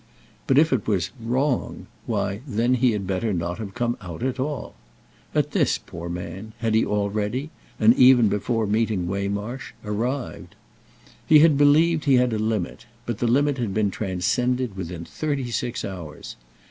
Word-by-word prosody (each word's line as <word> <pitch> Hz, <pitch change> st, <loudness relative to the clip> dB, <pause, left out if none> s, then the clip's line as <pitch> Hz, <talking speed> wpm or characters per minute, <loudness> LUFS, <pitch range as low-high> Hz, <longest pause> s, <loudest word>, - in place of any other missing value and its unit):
But 135 Hz, -, +3 dB
if 155 Hz, 0 st, +5 dB
it 120 Hz, -6 st, -1 dB
was 95 Hz, -6 st, 0 dB
"wrong"—why 120 Hz, -4 st, -2 dB
then 120 Hz, +1 st, +1 dB
he 125 Hz, -1 st, +3 dB
had 100 Hz, -2 st, -3 dB
better 95 Hz, +4 st, -1 dB
not 85 Hz, +1 st, -3 dB
have 100 Hz, -3 st, -7 dB
come 120 Hz, 0 st, -1 dB
out 85 Hz, -2 st, -7 dB
at 130 Hz, 0 st, -2 dB
all. 140 Hz, -1 st, -3 dB, 0.6 s
At -, -, +1 dB
this, -, -, +2 dB
poor 85 Hz, +1 st, -8 dB
man, 90 Hz, +5 st, -6 dB
had 115 Hz, -2 st, -1 dB
he 110 Hz, -, +4 dB
already—and 105 Hz, +3 st, 0 dB
even 125 Hz, -3 st, +6 dB
before 110 Hz, +3 st, 0 dB
meeting 105 Hz, -3 st, 0 dB
Waymarsh—arrived. 105 Hz, +5 st, -4 dB, 0.7 s
He 155 Hz, -, +8 dB
had 155 Hz, 0 st, +6 dB
believed 150 Hz, +3 st, +4 dB
he 140 Hz, -2 st, +5 dB
had 125 Hz, -1 st, +3 dB
a 110 Hz, -, -1 dB
limit, 110 Hz, -1 st, -2 dB, 0.2 s
but 120 Hz, -3 st, -3 dB
the 120 Hz, -, +1 dB
limit 140 Hz, +3 st, +2 dB
had 110 Hz, -5 st, -2 dB
been 105 Hz, -2 st, +1 dB
transcended 115 Hz, +5 st, -1 dB
within 85 Hz, -2 st, -6 dB
thirty 140 Hz, -, -3 dB
six 120 Hz, +1 st, -2 dB
hours. 85 Hz, -6 st, -8 dB
115 Hz, 155 wpm, -24 LUFS, 100-130 Hz, 0.7 s, He